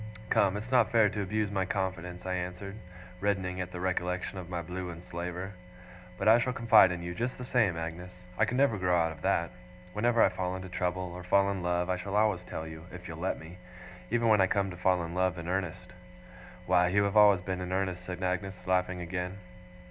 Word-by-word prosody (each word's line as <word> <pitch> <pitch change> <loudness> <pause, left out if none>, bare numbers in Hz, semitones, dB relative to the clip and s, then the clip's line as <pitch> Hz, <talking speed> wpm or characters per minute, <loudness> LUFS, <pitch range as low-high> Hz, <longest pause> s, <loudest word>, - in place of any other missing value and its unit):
'Come! 100 0 +3
It's 110 +5 -7
not 125 -4 +4
fair 110 -3 +5
to 105 +1 -3
abuse 105 +1 -1
my 95 -2 0
confidence,' 90 -2 -3
I 95 - -1
answered, 90 +2 -4 0.4
reddening 95 -2 -1
at 90 0 -5
the 90 - -6
recollection 90 +1 -2
of 90 -1 -8
my 90 -1 -2
blue 90 +2 -5
enslaver. 90 +2 -6 0.6
'But - - -1
I 115 +2 +8
shall 125 +1 0
confide 115 -6 +6
in 90 -1 -4
you, 85 0 -4
just 120 +7 -3
the 125 - -6
same, 110 -9 +2
Agnes. 90 +2 -7
I - - +3
can 125 - -2
never 130 -7 +3
grow 90 -1 +2
out 80 -1 +2
of - - -11
that. 85 0 +1 0.4
Whenever 115 +2 +3
I - - +5
fall 90 0 -3
into 95 0 -7
trouble, 90 0 -2
or 90 - -7
fall 100 +2 +3
in 95 -2 -3
love, 90 0 0
I 90 0 0
shall 100 +2 -4
always 105 -4 +3
tell 80 - -6
you, 80 +1 -9
if 90 0 -9
you'll 80 -1 -7
let 90 - -1
me 85 +3 -11 0.5
even 115 0 +1
when 105 -3 +5
I 95 - +5
come 100 0 0
to - - -7
fall 90 0 +2
in 85 0 -5
love 90 0 +1
in 85 0 -6
earnest.' 90 -1 -3 0.7
'Why, 90 0 +4
you 100 +3 +3
have 100 0 -1
always 105 -3 +7
been 90 0 -3
in 90 0 -4
earnest!' 95 -1 -1
said 90 0 -6
Agnes, 95 +1 -1
laughing 90 -1 +1
again. 90 +2 -4
90 Hz, 225 wpm, -30 LUFS, 90-100 Hz, 0.7 s, I